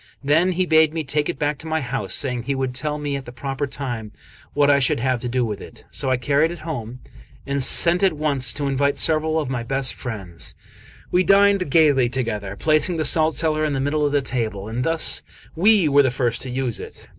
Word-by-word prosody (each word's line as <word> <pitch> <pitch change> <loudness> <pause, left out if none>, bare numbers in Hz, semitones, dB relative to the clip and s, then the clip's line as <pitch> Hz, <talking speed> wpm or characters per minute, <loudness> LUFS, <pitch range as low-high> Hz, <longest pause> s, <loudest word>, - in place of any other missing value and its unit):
Then 160 +6 +3
he 185 +1 0
bade 160 -1 +3
me 160 - -2
take 150 +2 -1
it 175 - -3
back 150 -1 -1
to 160 - -9
my 160 0 0
house, 125 -9 -2
saying 125 -4 -2
he 140 - -1
would 130 -1 -2
tell 150 +3 -3
me 145 -1 -3
at 135 -1 -6
the 120 - -9
proper 135 +3 -4
time 120 -6 -5 0.4
what 145 0 +4
I 140 -1 +4
should 125 -3 +1
have 130 -1 0
to 125 - -4
do 125 0 0
with 105 -3 -5
it. - - -13
So 135 - -3
I 130 - +2
carried 145 +5 +1
it 175 - -7
home, 125 -6 -6 0.4
and 140 0 -1
sent 170 +6 +4
at 190 -3 +3
once 140 -5 0
to 145 -1 -2
invite 140 +1 0
several 160 0 +1
of 150 - -3
my 130 -2 -3
best 135 +2 -1
friends; 95 -9 -4 0.6
we 180 +1 +3
dined 200 -3 +4
gaily 140 -5 +4
together, 105 -6 -3
placing 155 - +1
the 155 - +1
salt 160 0 +2
cellar 155 -1 0
in 150 -1 0
the 135 - -1
middle 145 +3 0
of 145 - +1
the 145 -1 +1
table, 110 -6 -3
and 115 +3 -3
thus 165 +2 +2 0.3
we 195 0 +4
were 145 0 +5
the 135 - +2
first 120 -2 -1
to 130 - -5
use 125 -2 -2
it. - - -11
140 Hz, 230 wpm, -21 LUFS, 125-155 Hz, 0.6 s, were